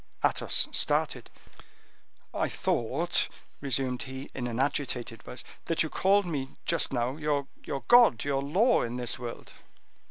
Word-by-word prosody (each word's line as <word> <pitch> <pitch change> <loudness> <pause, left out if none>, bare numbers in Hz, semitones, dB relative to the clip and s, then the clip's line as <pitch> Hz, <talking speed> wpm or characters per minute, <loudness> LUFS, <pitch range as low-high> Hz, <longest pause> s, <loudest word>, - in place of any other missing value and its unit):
Athos - - +4
started. - - +1 1.0
"I - - -1
thought," 145 +9 0 0.3
resumed 130 -2 0
he, 130 +1 -7
in 125 -2 -4
an 120 0 -4
agitated 130 -4 -1
voice, 125 - -8 0.2
"that 165 - +1
you 160 - -5
called 200 +1 +3
my 145 -6 -3 0.2
just - - +2
now 125 +2 -1
your 150 -2 -1 0.4
god, 240 - +6
your 140 -1 0
law 190 - +3
in 120 0 -3
this 125 -1 -2
world." 120 -1 -8
135 Hz, 135 wpm, -28 LUFS, 125-155 Hz, 1.0 s, god